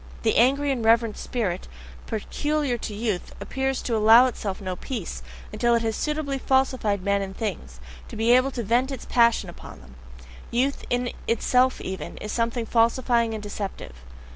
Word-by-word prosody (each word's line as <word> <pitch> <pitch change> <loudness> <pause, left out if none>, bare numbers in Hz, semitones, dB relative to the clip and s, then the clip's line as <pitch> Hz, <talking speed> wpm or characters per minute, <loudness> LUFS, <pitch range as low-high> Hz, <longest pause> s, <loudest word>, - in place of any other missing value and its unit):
The - - +2
angry 275 +4 +3
and 250 -4 -2
reverent 230 -1 +3
spirit 195 -7 -3 0.4
peculiar 290 +5 -1
to 220 -2 -5
youth 210 -4 -3
appears 265 0 -2
to 235 - -1
allow 225 +3 +7
itself 210 -6 -3
no 185 -3 -4
peace, 185 - -5 0.3
until 235 0 +2
it 230 - 0
has 225 -1 -1
suitably 300 -3 -2
falsified 255 -8 +1
men 200 0 +1
and 195 -1 -6
things, 150 - -5 0.3
to - - -9
be 225 +2 +2
able 255 +2 +5
to 245 -3 -4
vent 245 +6 +1
its 265 - -6
passion 235 -4 +3
upon 175 - -11
them: 65 +1 -16 0.6
youth 260 +4 0
in 245 0 0 0.2
itself 250 +2 +2
even, 190 -5 -6
is 210 - -6
something 230 0 -1
falsifying 235 0 +2
and 215 - -6
deceptive. 200 - -6
230 Hz, 165 wpm, -25 LUFS, 210-255 Hz, 0.6 s, allow